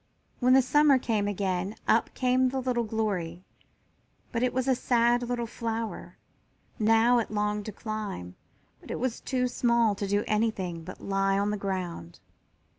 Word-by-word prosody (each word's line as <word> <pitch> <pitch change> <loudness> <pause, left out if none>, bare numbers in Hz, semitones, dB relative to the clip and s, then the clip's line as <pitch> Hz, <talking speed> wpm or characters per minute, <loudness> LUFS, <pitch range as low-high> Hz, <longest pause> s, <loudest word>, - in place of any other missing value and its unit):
When 250 0 +4
the 265 0 +6
summer 295 +1 +5
came 220 -5 0
again 195 0 -2
up 225 - +3
came 255 0 +2
the 265 +1 -2
little 250 -2 0
Glory, 190 -6 -2 0.9
but 230 - -1
it 250 0 +2
was 260 +1 -1
a 265 - +4
sad 240 -1 +2
little 245 -1 -2
flower. 225 -1 -5 0.6
Now 225 +3 +4
it 230 - -2
longed 210 0 -1
to - - -3
climb, 205 - -5 0.4
but - - -16
it - - -3
was 250 -2 -2
too 250 -2 0
small 235 -3 +2
to 200 0 -4
do 205 +1 +1
anything 195 -6 -1
but 185 +3 -10
lie 195 0 +1
on 200 +1 +1
the - - -1
ground. 185 - -4
220 Hz, 165 wpm, -28 LUFS, 200-245 Hz, 0.9 s, the